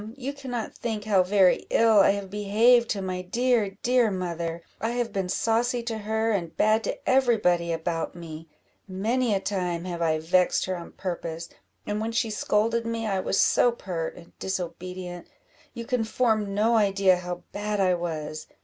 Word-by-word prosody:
you 275 +1 -5
cannot 255 -5 -5
think 220 -3 -4
how 205 -3 +3
very 185 0 +3
ill 225 -2 +5
I 195 - +6
have 200 -2 -6
behaved 225 +4 +3
to 200 -2 -2
my 185 -1 -3
dear, 215 0 0
dear 245 -2 +3
mother 170 -3 -3 0.2
I 225 +2 -1
have 240 -1 -2
been 190 -2 -2
saucy 235 +4 +1
to 230 -2 -3
her, 220 +2 0
and 175 -6 -2
bad 215 +1 +3
to - - -5
every 260 -3 +4
body 175 -4 +1
about 165 0 -2
me; 165 -1 -9 0.4
many 220 +4 0
a - - +1
time 180 -3 -2
have 175 -2 -4
I 160 -1 +2
vexed 180 +3 +2
her 185 - -2
on 170 -1 -9
purpose; 170 -2 -5 0.4
and 210 +1 -2
when 225 +1 -3
she 225 -1 0
scolded 225 +2 +1
me, 230 0 -3
I 195 -3 0
was 190 - 0
so 245 - +4
pert 175 -8 -5
and 170 - -15
disobedient 180 -1 -5 0.5
you 235 - -6
can 250 -2 0
form 220 -3 0
no 225 +3 +3
idea 195 -3 +3
how 180 0 -6
bad 210 0 -2
I 185 -2 +3
was. 155 -3 -4
200 Hz, 180 wpm, -26 LUFS, 180-225 Hz, 0.5 s, I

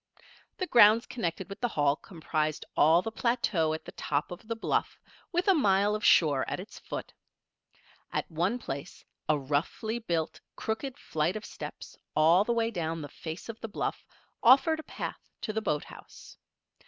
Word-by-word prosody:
The 370 - -1
grounds 230 - +6
connected 190 -6 -3
with 195 +1 -8
the 245 - +2
Hall 145 -9 +2
comprised 155 -2 -3
all 160 +4 +5
the 225 - -3
plateau 220 -9 +1
at 160 - -4
the - - -8
top 145 +2 -2
of 175 +4 -9
the 230 - -2
bluff, 225 - -1 0.3
with 355 +1 0
a 390 - +7
mile 205 - +3
of 210 0 -3
shore 145 -5 +5
at - - -3
its - - -9
foot. - - -6 1.0
At - - -2
one 175 +9 +1
place 140 - -7 0.2
a 155 - +4
roughly 150 - -1
built, 170 -8 -2
crooked 245 +4 -3
flight 160 +4 -1
of 215 - -5
steps - - -8 0.2
all 165 +5 +6
the 235 - -1
way 230 -1 +1
down 165 -4 -3
the 145 - -7
face 160 +4 -7
of 230 -1 -7
the 225 - -5
bluff, - - -3 0.4
offered 270 +6 +6
a 315 - -10
path - - -5 0.2
to 215 - -3
the 220 - -1
boathouse. 150 -8 -5
195 Hz, 175 wpm, -29 LUFS, 160-230 Hz, 1.0 s, a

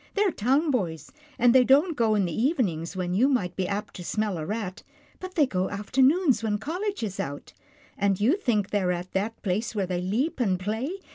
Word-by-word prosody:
They're 405 -2 +3
town 275 +7 +1
boys, 175 - -2 0.3
and 240 0 +5
they 260 -1 +7
don't 290 +7 +4
go 225 -4 +2
in 200 -2 +2
the 170 - -3
evenings, 210 - 0
when 180 -1 -2
you 245 +9 +3
might 190 -10 0
be 185 -2 -1
apt 205 +2 -4
to 180 - -7
smell 210 -1 -2
a 155 - -4
rat, 210 -1 -4 0.4
but 370 0 -8
they 305 -5 +5
go 190 -7 -1
after 205 +6 -1
noons 285 0 +4
when 215 -2 0
college 360 - -3
is 195 -3 -4
out, 145 +1 -5 0.5
and 200 -2 +1
you 240 - +3
think 220 - 0
they 205 - +1
are 180 -1 +1
at 180 +1 -4
that 210 +4 -2
place 210 +4 -1
where 200 -2 0
they 180 -1 -2
leap 235 - -1
and 190 -7 +1
play. 220 +8 -2
215 Hz, 220 wpm, -26 LUFS, 185-265 Hz, 0.5 s, they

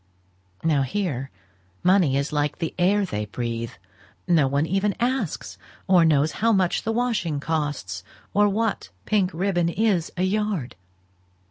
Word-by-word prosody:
Now 155 -4 +3
here, 135 -3 -2 0.5
money 180 -7 +4
is 140 +2 -2
like 145 0 0
the 165 - -3
air 200 +3 +3
they 105 - -3
breathe. 115 +1 -4 0.5
No 165 -6 +4
one 140 +3 +1
even 195 +3 0
asks 230 - -2 0.3
or 180 -3 +5
knows 155 -1 +3
how 230 +1 +1
much 190 -4 +2
the 225 - -2
washing 225 -10 0
costs, 145 - -3 0.3
or 205 +1 +4
what 220 +1 -1 0.2
pink 200 -4 +2
ribbon 175 -1 0
is 195 -3 +1
a 180 - +1
yard. 195 - -1
170 Hz, 140 wpm, -24 LUFS, 140-200 Hz, 0.5 s, or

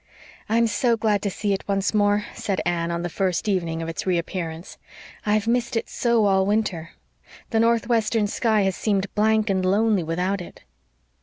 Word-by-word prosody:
"I'm 230 +1 +3
so 230 +2 +1
glad 215 -2 +1
to 200 - -1
see 200 +1 -1
it 195 - -4
once 195 0 0
more," 205 0 +2
said 195 -2 -2
Anne, 170 -1 0
on 170 0 -2
the - - -1
first 185 +2 -1
evening 170 -5 -1
of - - -5
its 165 +3 -5
reappearance. 170 -1 -3 0.5
"I've 210 0 +2
missed 235 0 0
it - - -4
so 235 -3 +2
all 190 -1 +3
winter. 195 -5 -1 0.6
The 225 - +2
northwestern 230 -1 +2
sky 215 +1 +1
has 190 -1 0
seemed 200 -2 -1
blank 215 +1 +2
and 190 -2 +1
lonely 205 +1 +2
without 180 +4 -1
it." 175 - -12
200 Hz, 175 wpm, -23 LUFS, 180-220 Hz, 0.6 s, I'm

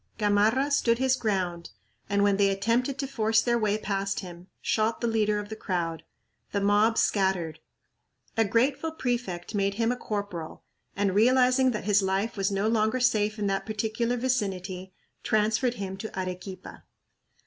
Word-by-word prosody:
Gamarra 215 +7 +2
stood 235 -5 +3
his 260 +1 +2
ground 185 -7 -2 0.4
and, 200 0 +2
when 200 -1 +3
they 200 -1 +4
attempted 230 +7 0
to 275 - -2
force 225 -4 +2
their 235 -1 +1
way 210 -1 +1
past 200 -1 -2
him, 175 -1 -10
shot 220 +1 0
the - - -2
leader 215 -2 +1
of 205 0 -5
the 220 - -5
crowd. 170 -6 -3 0.5
The 200 - +1
mob 205 +3 +3
scattered. 185 -6 +1 0.8
A 225 - +4
grateful 250 +9 +1
prefect 240 - -3
made 200 -1 0
him 230 +2 +1
a - - -1
corporal 200 -8 -5 0.3
and, 200 -1 +1
realizing 255 +4 +4
that 220 -4 -3
his 205 -1 +3
life 195 +3 -1
was 195 -1 0
no 200 +1 0
longer 220 +2 +1
safe 215 -4 +2
in 210 - -2
that 195 +1 -1
particular 220 +3 -1
vicinity, 195 -7 -2 0.3
transferred 220 +4 +1
him 195 -2 -5
to 195 -1 -6
Arequipa. 185 +1 -7
210 Hz, 160 wpm, -27 LUFS, 195-230 Hz, 0.8 s, they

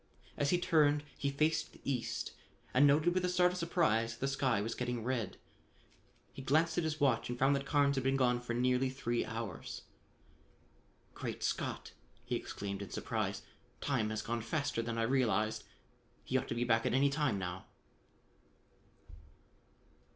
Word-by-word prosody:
As 140 - +1
he 180 - +4
turned 150 -4 +3
he 140 - -1
faced 155 +2 0
the - - -17
east 130 -4 -2 0.4
and 140 +3 +6
noted 150 +5 +4
with 185 0 +1
a 180 - +1
start 180 0 +4
of 180 - -5
surprise 150 - +1
that - - -19
the 135 - 0
sky 135 -5 +1
was 110 +3 -2
getting 125 -2 -3
red. 115 -6 -2 1.0
He - - -8
glanced 160 +5 +2
at - - 0
his 155 -1 -2
watch 130 -5 +2
and 120 - -3
found 135 +3 +4
that 140 0 -3
Carnes 140 -1 +3
had 135 - 0
been 135 +1 +2
gone 125 -2 +2
for 120 -1 -3
nearly 125 +1 +2
three 120 -3 -1
hours. 115 +1 -6 1.3
"Great - - -5
Scott!" - - -2 0.3
he - - -1
exclaimed 100 0 -4
in 100 - -6
surprise. - - -2 0.4
"Time 125 -7 0
has 110 0 -3
gone 115 0 -2
faster 140 +1 -1
than 115 0 -3
I 115 - +1
realized. 115 -3 +1 0.6
He - - -4
ought - - +1
to - - -3
be 120 - 0
back 115 -2 +2
at - - +1
any 140 +1 +4
time 140 -7 +1
now." 90 0 -5
130 Hz, 175 wpm, -34 LUFS, 115-145 Hz, 1.3 s, and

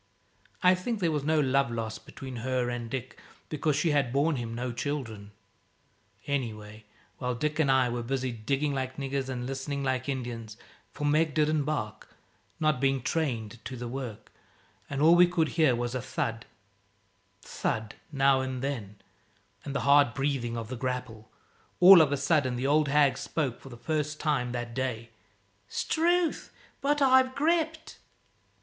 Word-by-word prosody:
I 180 0 +7
think 205 +5 -2
there 170 -4 +1
was 150 -2 -1
no 155 +1 +2
love 135 -2 +2
lost 110 -2 -5
between 130 -2 -8
her 125 0 -1
and 120 -1 -5
Dick, 125 -1 -6 0.3
because 155 -1 0
she 155 +2 +1
had 140 -4 +1
borne 145 +3 +1
him 115 -1 -4
no 125 +1 -3
children. 120 -6 -4 1.0
Anyway, 110 -6 -4 0.3
while 125 -1 -2
Dick 150 +5 -2
and 140 -4 +3
I 130 -1 +4
were 120 0 -2
busy, 130 +1 -2
digging 135 +6 -1
like 130 -1 -3
niggers 135 -1 -3
and 125 -1 -4
listening 135 +2 -4
like 130 0 -1
Indians 120 -4 -5 0.3
for 145 - -5
Meg 155 +1 +2
didn't 155 -1 +2
bark, 110 -9 -4 0.4
not 155 -4 +1
being 135 -2 +1
trained 120 -9 -2
to 130 +1 -6
the 120 0 -5
work, 120 -4 -7 0.6
and 140 +1 -1
all 165 +2 +7
we 175 0 +7
could 165 -3 +1
hear 155 -7 +3
was 120 0 -3
a 130 - -2
thud, 115 -1 -3 1.0
thud 110 -1 -3 0.2
now 135 -2 +3
and 130 -1 -4
then, 115 -8 -4 0.7
and 140 -1 -6
the - - 0
hard 140 -4 +4
breathing 135 -4 -1
of 115 -1 -5
the 130 - -4
grapple 125 -3 -4 0.5
all 180 -1 +10
of 150 -3 +3
a 145 - +1
sudden 140 -5 +1
the 125 +2 -2
old 150 +2 +3
hag 140 -2 +3
spoke, 135 -7 -2
for 135 - -11
the 120 - -10
first 150 +4 -2
time 140 -6 0
that 120 -1 -4
day 120 -3 -3 0.6
"S'trewth, 345 +1 0 0.3
but 290 0 +2
I've 260 -1 +4
gripped!" 320 +1 0
135 Hz, 165 wpm, -28 LUFS, 120-150 Hz, 1.0 s, all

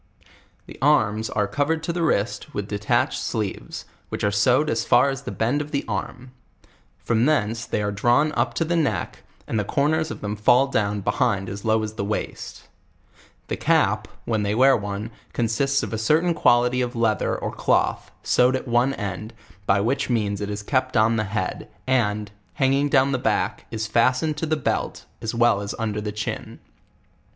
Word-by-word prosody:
The - - -12
arms 110 -7 +2
are 105 -1 0
covered 155 +6 -1
to 170 - -2
the 175 - -2
wrist 150 -1 -1
with 105 -1 -3
de 105 -1 -4
tatched 105 - +1
sleeves, 105 -4 -4 0.2
which - - -4
are 105 - +2
sewed 125 +9 +3
as - - 0
far 140 - +4
as 135 0 -5
the - - -6
bend 125 +6 0
of 150 - -6
the 140 -2 -2
arm; 125 +4 -5 0.7
from 115 -1 0
tiseiice 115 -6 0
they 105 - -1
are 105 - -1
drawn 120 +9 +2
up - - -1
to 165 - 0
the 170 +2 0
neck, 160 -4 -1 0.2
and 110 - -1
the - - 0
cor 140 +8 +1
ners 160 0 0
of - - -7
them 105 0 -3
fall 125 +6 +4
duwa 105 -3 0
behind 100 -5 0
as 100 +1 -7
low 110 0 +2
as 105 0 -4
the 105 - -4
waist. 105 +2 -5 0.8
The - - -2
cap, - - +2 0.2
when 110 -2 0
they 105 0 0
wear 135 +3 +6
ono, 105 0 -3 0.2
consists 135 +4 +1
of - - -4
a 110 - -2
certain 160 +10 +2
quantity 125 -3 +3
of 125 0 -2
leath 110 -3 +1
er - - 0
or - - -4
cloth, - - 0
sewed 125 +1 +3
at 130 - -4
one 120 +3 +2
end, 105 +3 -5 0.3
by 100 +1 +3
which 135 +7 0
means 105 -4 0
it 100 - -3
is 105 0 -4
kept 130 +1 0
on 110 +1 +4
the 105 - 0
head, 95 -2 -3 0.2
and, 105 -5 0 0.2
hanging 135 +1 +2
down 135 0 +3
the 130 - 0
back, - - -1
is 110 -1 -3
fastened 130 +7 +2
to 160 - -2
the 155 0 +1
belt, 145 - -2 0.2
as 115 +1 -3
well 120 -4 +3
as 100 - -4
under 105 -2 -2
the 105 0 -3
ciiin. 105 -1 -5
115 Hz, 195 wpm, -23 LUFS, 105-135 Hz, 0.8 s, wear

